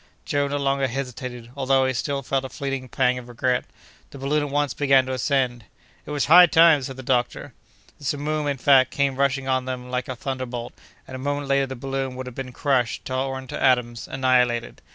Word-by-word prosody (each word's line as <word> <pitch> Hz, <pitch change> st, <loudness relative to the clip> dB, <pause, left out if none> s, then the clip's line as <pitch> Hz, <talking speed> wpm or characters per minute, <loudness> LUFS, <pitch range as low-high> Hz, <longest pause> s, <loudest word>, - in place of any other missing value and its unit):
Joe 145 Hz, 0 st, 0 dB
no 145 Hz, +1 st, -2 dB
longer 140 Hz, -1 st, +1 dB
hesitated, 125 Hz, -2 st, -6 dB
although 135 Hz, -1 st, +2 dB
he 130 Hz, -, 0 dB
still 140 Hz, +2 st, -2 dB
felt 135 Hz, +1 st, -1 dB
a 130 Hz, -, -6 dB
fleeting 135 Hz, -3 st, -4 dB
pang 125 Hz, +1 st, +1 dB
of 120 Hz, -, -12 dB
regret. 125 Hz, +1 st, 0 dB, 0.4 s
The -, -, -11 dB
balloon 140 Hz, +3 st, 0 dB
at 145 Hz, -, -3 dB
once 145 Hz, -2 st, 0 dB
began 135 Hz, -2 st, +3 dB
to 130 Hz, -, -4 dB
ascend. 130 Hz, -3 st, 0 dB, 0.4 s
"It -, -, -8 dB
was 145 Hz, -2 st, 0 dB
high 175 Hz, +4 st, +8 dB
time!" 165 Hz, -3 st, +6 dB
said 130 Hz, 0 st, -6 dB
the 130 Hz, -, -8 dB
doctor. 125 Hz, -1 st, -1 dB, 0.5 s
The 145 Hz, -, -11 dB
simoom, 150 Hz, +2 st, -1 dB
in 140 Hz, -1 st, -1 dB
fact, 130 Hz, -1 st, +5 dB
came 140 Hz, -1 st, 0 dB
rushing 135 Hz, -1 st, +1 dB
on 130 Hz, -1 st, 0 dB, 0.2 s
like 125 Hz, 0 st, -2 dB
a 130 Hz, -, -3 dB
thunderbolt, 125 Hz, -2 st, -5 dB, 0.3 s
and -, -, -10 dB
a 130 Hz, -, -5 dB
moment 145 Hz, +1 st, -2 dB
later 140 Hz, 0 st, +2 dB
the 130 Hz, -, -6 dB
balloon 135 Hz, 0 st, -4 dB
would 130 Hz, 0 st, -6 dB
have 125 Hz, -, -8 dB
been 130 Hz, 0 st, -6 dB
crushed, 125 Hz, -2 st, 0 dB
torn 130 Hz, 0 st, -3 dB
to -, -, -4 dB
atoms, 125 Hz, -3 st, +1 dB
annihilated. 125 Hz, -3 st, +1 dB
135 Hz, 205 wpm, -23 LUFS, 125-140 Hz, 0.5 s, high